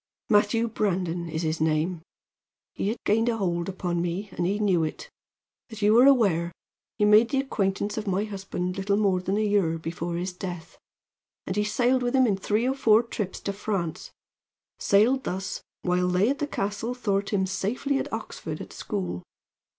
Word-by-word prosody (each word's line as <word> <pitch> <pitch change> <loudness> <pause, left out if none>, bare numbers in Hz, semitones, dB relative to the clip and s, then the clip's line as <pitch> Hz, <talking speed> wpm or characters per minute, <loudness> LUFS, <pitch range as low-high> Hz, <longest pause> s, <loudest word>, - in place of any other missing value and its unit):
"Matthew 215 +2 +3
Brandon 180 -6 -1
is 160 +1 -3
his 155 0 -1
name. 160 +2 +1 0.7
He - - -2
had 220 +4 -1
gained 225 +3 +3
a 230 - 0
hold 175 -3 -1
upon 175 -2 -2
me, 175 +4 -3
and 175 -1 -1
he 200 +2 0
knew 190 -6 +2
it. 475 - -5 0.6
As 220 -2 -7
you 210 +1 +5
are 255 - +8
aware, 195 -11 +3 0.5
he 210 - +3
made 215 +3 +6
the 270 - +1
acquaintance 205 -4 -1
of 215 - -7
my 195 +1 +1
husband 190 -3 -4
little 200 +1 +1
more 195 -4 +2
than 190 +2 -1
a 215 - +1
year 195 -6 +2
before 170 +1 -4
his 180 +2 -3
death; 180 -2 -7 0.7
and 185 - -3
he 210 - +2
sailed 245 +4 +2
with 245 +1 0
him 260 -1 +5
in 210 -5 +2
three 215 +5 0
or 265 - +2
four 230 -4 +4
trips 210 -5 -4
to 200 - -3
France 195 -5 -3 0.7
sailed 235 +7 +3
thus 190 +1 -4 0.2
while 180 0 +1
they 185 +7 +3
at 280 - -3
the 295 - -1
castle 220 0 -3
thought 200 -5 -1
him 195 -2 +1
safely 210 +9 -1
at - - -4
Oxford - - -5
at - - -9
school. 185 - -4
200 Hz, 185 wpm, -26 LUFS, 180-220 Hz, 0.7 s, are